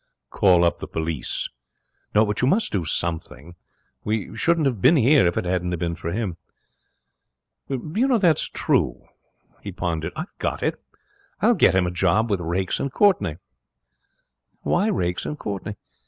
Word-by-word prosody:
'Call 90 -3 +4
up 85 - +1
the - - -6
police.' 80 -2 -2 0.7
'No, 105 +1 +6
but 105 0 -1
you 125 - +3
must 215 +10 +2
do 95 -4 0
something. 80 -2 -3 0.5
We 105 -2 -2
shouldn't 170 -2 +2
have 125 -8 0
been 140 +7 +6
here 135 - +5
if 85 - -1
it - - -1
hadn't 90 -1 -1
been 85 0 -2
for 85 0 -5
him.' 95 -4 -3 1.3
'That's 175 - +1
true!' - - 0 0.6
He - - -6
pondered. 80 -1 -3
'I've 165 +5 -6
got - - -2
it; - - -1 0.6
I'll 235 +3 +4
get 155 - +4
him 95 -1 +3
a 90 - -2
job 110 +6 +1
with 100 - +1
Raikes 90 +3 -1
and 140 - -2
Courtenay.' 185 - +2 1.3
'Why 190 +5 +1
Raikes 90 - -1
and 150 - -4
Courtenay?' 105 -2 -5
100 Hz, 155 wpm, -23 LUFS, -, 1.3 s, No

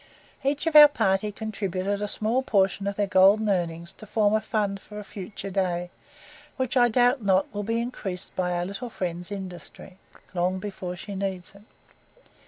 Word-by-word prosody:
Each 280 +3 0
of 325 -2 -1
our 300 0 +12
party 195 -6 0
contributed 200 -2 -3
a 210 - -1
small 220 +5 +1
portion 195 -4 +1
of 200 - -2
their 205 - +1
golden 200 +2 +5
earnings 170 -1 -1
to 215 - -12
form 210 -1 +2
a 215 - +2
fund 205 -3 -1
for 210 +1 -12
a 210 - -5
future 195 0 -7
day, 180 -2 -1 0.7
which 260 -1 -2
I 245 -1 +6
doubt 245 +2 +3
not 195 -2 +2
will 205 - -2
be 230 +3 -1
increased 195 -6 -5
by 180 -1 0
our 175 0 -1
little 200 +6 -6
friend's 175 -3 -4
industry, 190 -1 -8 0.3
long 180 +1 0
before 185 -2 -5
she 200 +3 -8
needs 190 -2 -4
it. 200 - -16
200 Hz, 180 wpm, -26 LUFS, 185-215 Hz, 0.7 s, our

